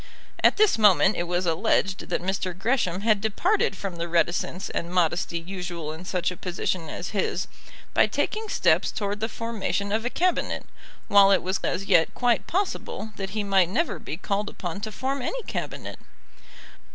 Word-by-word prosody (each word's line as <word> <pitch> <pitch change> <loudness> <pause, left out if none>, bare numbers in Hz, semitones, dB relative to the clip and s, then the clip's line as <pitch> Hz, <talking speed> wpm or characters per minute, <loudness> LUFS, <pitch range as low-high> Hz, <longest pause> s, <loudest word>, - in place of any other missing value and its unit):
At - - +5
this 420 - +4
moment 205 -1 +5
it 175 - -2
was 175 +1 0
alleged 190 +2 +1
that - - -1
Mr. 185 -1 -2
Gresham 195 -4 0
had 215 -2 +3
departed 220 - +1
from 190 -3 -5
the 170 0 -3
reticence 175 +2 0
and 170 - -3
modesty 175 -1 +1
usual 175 -3 -5
in 160 +4 -9
such 180 -1 -1
a 180 - -8
position 175 -2 -2
as 175 - -5
his, 200 -3 -1 0.5
by - - +5
taking 435 0 -2
steps - - +3
towards 205 -1 -3
the 225 - 0
formation 215 -3 -2
of 220 +2 0
a 245 - 0
Cabinet, 360 +6 0 0.4
while 200 -1 +7
it 195 - +4
was 185 +2 -1
as 185 +2 -1
yet 165 -4 +3
quite 245 -2 +1
possible 360 - -2
that 195 -1 -4
he 210 - +1
might 195 -3 +3
never 325 - 0
be 155 - -6
called 200 +3 -2
upon 175 +2 -6
to 215 +1 -4
form 265 +5 -2
any - - -3
Cabinet. - - -5
195 Hz, 175 wpm, -25 LUFS, 180-220 Hz, 0.5 s, while